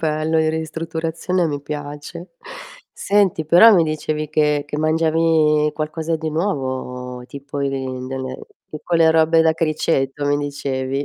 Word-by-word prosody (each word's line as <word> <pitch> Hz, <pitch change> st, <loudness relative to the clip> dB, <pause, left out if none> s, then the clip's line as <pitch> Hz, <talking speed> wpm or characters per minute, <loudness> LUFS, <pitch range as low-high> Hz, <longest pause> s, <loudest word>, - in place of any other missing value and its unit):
bello, 155 Hz, 0 st, 0 dB
in 160 Hz, 0 st, +2 dB
ristrutturazione 165 Hz, +2 st, -2 dB
mi 145 Hz, -2 st, -4 dB
piace. 145 Hz, +4 st, -7 dB, 0.6 s
Senti, 200 Hz, -5 st, +1 dB
però 180 Hz, +8 st, +8 dB
mi 175 Hz, -5 st, +4 dB
dicevi 155 Hz, -1 st, -3 dB
che 150 Hz, -1 st, +1 dB
che 145 Hz, -, -5 dB
mangiavi 155 Hz, -1 st, +2 dB
qualcosa 160 Hz, +1 st, -3 dB
di 160 Hz, 0 st, -4 dB
nuovo 130 Hz, -7 st, -3 dB
tipo 140 Hz, +1 st, -7 dB
di 140 Hz, -, 0 dB, 0.4 s
delle 130 Hz, -1 st, -5 dB, 0.3 s
tipo 155 Hz, +3 st, -4 dB
le 165 Hz, -1 st, +5 dB
robe 160 Hz, 0 st, +4 dB
da 160 Hz, 0 st, +4 dB
criceto 150 Hz, -3 st, -1 dB
mi 145 Hz, 0 st, +2 dB
dicevi. 140 Hz, -1 st, -3 dB
155 Hz, 135 wpm, -20 LUFS, 145-160 Hz, 0.6 s, però